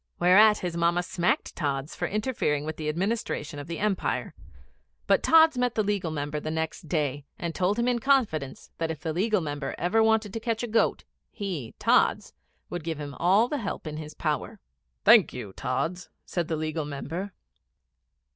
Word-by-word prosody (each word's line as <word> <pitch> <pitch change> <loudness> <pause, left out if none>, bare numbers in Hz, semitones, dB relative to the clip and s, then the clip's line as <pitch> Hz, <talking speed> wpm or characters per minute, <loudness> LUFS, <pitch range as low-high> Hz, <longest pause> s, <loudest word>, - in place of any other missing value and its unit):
Whereat 210 +5 +6
his 175 -2 -4
Mamma 170 +1 +2
smacked 175 0 -1
Tods 140 -2 -2
for - - -2
interfering 210 - -1
with 155 0 -4
the 155 -1 -2
administration 170 -4 -2
of 145 - -8
the 170 -1 -4
Empire; 205 -2 -1 0.7
but - - +3
Tods 320 -4 +6
met 245 -1 +1
the 215 - +2
Legal 200 -4 -1
Member 150 -1 -3
the 155 - -5
next 160 +1 -3
day, 145 -3 -1
and 170 -1 -4
told 190 +4 +1
him 235 +1 +1
in 245 -1 +2
confidence 225 - 0
that 165 -1 -1
if 160 -3 -5
the 160 +1 -2
Legal 210 +3 +1
Member 145 -3 -4
ever 180 +7 +2
wanted 220 -2 +2
to 225 - -3
catch 230 0 -2
a - - -1
goat, 225 0 +1 0.3
he, 175 - -5
Tods, - - +2 0.3
would 175 -2 -5
give 160 -2 -3
him 145 -1 -6
all 195 +7 +4
the 290 +2 -2
help 200 -6 -4
in 155 -1 -5
his 155 0 -8
power. - - -2 0.5
'Thank - - +7
you, 95 - -7
Tods,' 170 - -3 0.2
said 175 -3 -2
the 165 - -1
Legal 155 0 -2
Member. 160 +7 -5
175 Hz, 185 wpm, -27 LUFS, 155-215 Hz, 0.7 s, Thank